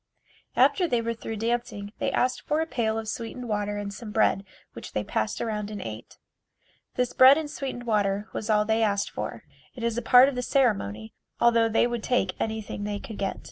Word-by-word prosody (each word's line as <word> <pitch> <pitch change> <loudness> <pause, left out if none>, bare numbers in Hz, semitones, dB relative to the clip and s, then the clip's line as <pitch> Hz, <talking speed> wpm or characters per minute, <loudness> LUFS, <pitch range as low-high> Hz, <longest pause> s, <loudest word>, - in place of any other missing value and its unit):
After 365 -3 +4
they 240 -6 +1
were 230 0 -2
through 225 0 -6
dancing 220 -2 -3
they - - 0
asked 255 0 +1
for 305 +1 -1
a 320 - +1
pail 225 -7 -1
of 225 -1 -4
sweetened 235 +3 -5
water 205 -1 -1
and 200 -1 -4
some 215 +1 -8
bread 210 -2 +2 0.3
which 115 - -9
they 105 - -1
passed 110 +1 -2
around 210 -2 -3
and 210 -1 -6
ate. 110 - -8 0.8
This 250 -1 0
bread 265 +2 +8
and 315 -1 -2
sweetened 265 -4 -5
water 205 -2 0
was 215 - -4
all 210 -1 +3
they 220 +1 +1
asked 200 -2 +1
for. - - -5 0.3
It 240 - -7
is 235 0 0
a - - -5
part 250 +1 +7
of 280 - -1
the 250 - -2
ceremony, 195 - 0 0.3
although 230 -1 +4
they 225 - +3
would 240 -1 -2
take 215 -6 +1
anything 220 -2 -3
they 205 0 -2
could 210 +1 -9
get. 195 -1 -2
220 Hz, 210 wpm, -26 LUFS, 205-240 Hz, 0.8 s, bread